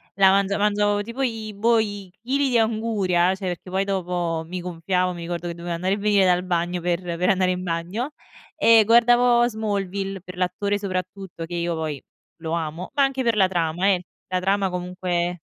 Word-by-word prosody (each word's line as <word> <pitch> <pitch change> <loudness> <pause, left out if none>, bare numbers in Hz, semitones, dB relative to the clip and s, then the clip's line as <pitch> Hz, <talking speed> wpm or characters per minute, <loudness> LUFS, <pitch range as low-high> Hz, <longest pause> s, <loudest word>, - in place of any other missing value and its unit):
la 195 -1 +6
mangia 200 +1 +2
mangiavo 205 0 +2
tipo 235 +5 -4
i 225 -3 -3
boh, 230 +3 +3
i 205 -3 -4
chili 270 +4 0
di 240 -2 +3
anguria, 210 -5 +1
cioè 190 0 -5
perché 180 +1 -5
poi 190 +1 +1
dopo 175 -4 -2
mi 180 +2 -5
gonfiavo, 180 +1 -1
mi 175 - -8
ricordo 170 0 -4
che 170 - -5
dovevo 170 0 -5
andare 185 +3 0
e - - -6
venire 205 -2 +3
dal 180 0 +3
bagno, 175 0 -1
per 175 +1 -1
per 175 +1 -1
andare 185 -2 +3
in 180 0 -3
bagno, 180 - -3 0.4
e 225 -1 +6
guardavo 240 +1 +5
"Smallville" 200 -3 -3
per 180 0 -11
l'attore 200 +3 0
soprattutto; 185 -3 -5
che 175 - -6
io 170 0 -1
poi 155 -3 -3 0.4
lo 160 -1 -4
amo, 165 +1 -3
ma 280 - +1
anche 270 -1 0
per 235 -2 +2
la 195 -3 +4
trama, 175 +1 0
eh. 180 -1 -2 0.2
La 185 0 -1
trama, 195 +1 +1
comunque 180 -1 -2
185 Hz, 195 wpm, -23 LUFS, 175-210 Hz, 0.4 s, la